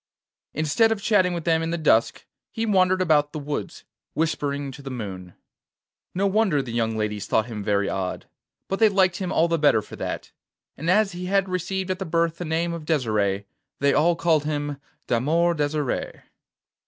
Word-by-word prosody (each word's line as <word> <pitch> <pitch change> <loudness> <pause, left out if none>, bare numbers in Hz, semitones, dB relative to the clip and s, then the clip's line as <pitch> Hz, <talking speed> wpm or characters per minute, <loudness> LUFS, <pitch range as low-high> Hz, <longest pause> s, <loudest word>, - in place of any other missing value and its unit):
Instead 160 +10 +2
of 220 - 0
chatting 200 -3 +3
with 170 -2 -3
them 165 -1 +2
in 165 - -2
the 170 - -1
dusk, 135 -8 +2 0.3
he 225 - -2
wandered 185 -3 +3
about 150 -4 +2
the - - -4
woods, 145 0 -5 0.3
whispering 145 -3 -1
to 135 - -11
the 135 - -7
moon. 95 -8 -7 0.8
No 195 +2 +1
wonder 195 -6 +2
the 125 - -7
young 115 -1 0
ladies 105 -1 -2
thought 110 - +2
him 110 -4 -6
very 100 -1 +1
odd, 95 -1 -3 0.4
but 195 - -2
they 220 -1 +6
liked 190 -3 +2
him 185 -2 -3
all 165 - +3
the 165 -1 0
better 145 -8 +4
for - - -11
that; - - -5 0.4
and 165 +3 -3
as 205 +2 +4
he 180 0 -6
had 195 0 +2
received 185 +1 -2
at 185 - -3
his 190 -4 -5
birth 165 0 +1
the 175 - -3
name 165 +2 -1
of 165 -2 -6
Desire, 110 -10 0 0.3
they 140 0 +2
all 170 +3 +3
called 165 -3 +2
him 145 -1 -2 0.3
d'Amour 160 +8 +2
Desire. 150 -3 -2
160 Hz, 190 wpm, -24 LUFS, 140-185 Hz, 0.8 s, they